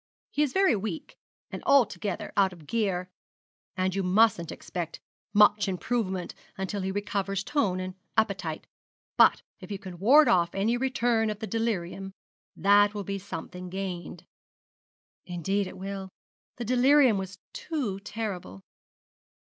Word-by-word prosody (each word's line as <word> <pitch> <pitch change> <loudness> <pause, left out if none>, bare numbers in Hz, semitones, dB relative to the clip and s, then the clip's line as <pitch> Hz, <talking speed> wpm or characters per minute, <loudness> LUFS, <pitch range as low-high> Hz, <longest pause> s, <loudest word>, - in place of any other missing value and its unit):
He 295 - 0
is 295 -3 +2
very 385 -7 +4
weak, 200 -4 -5 0.4
and - - -6
altogether 215 -6 +2
out 195 -2 +4
of 165 -4 -14
gear; 185 -2 -1 0.7
and 185 0 +1
you 195 - 0
mustn't 185 -2 +3
expect 170 -3 -5 0.3
much 205 -1 +5
improvement 190 -1 -2 0.2
until 190 +1 -3
he 190 +1 -2
recovers 195 -1 -2
tone 200 -9 0
and 185 0 -4 0.2
appetite; 190 -7 0 0.5
but - - +5 0.2
if - - -11
you 200 - -3
can 185 -3 -10
ward 280 +10 +7
off 170 -1 +3
any 210 +5 +1
return 245 -3 +1
of 210 - -3
the 220 - -5
delirium, 195 -4 -2 0.4
that 205 +3 +4
will 205 - -3
be 195 +1 -4
something 180 -1 -7
gained.' 185 -2 -5 1.0
'Indeed 190 +3 -1
it - - -9
will. 195 0 -5 0.5
The 240 - -5
delirium 255 -1 +5
was 190 0 -6 0.2
too 310 - -3
terrible.' 195 - -6
195 Hz, 140 wpm, -28 LUFS, 185-225 Hz, 1.0 s, ward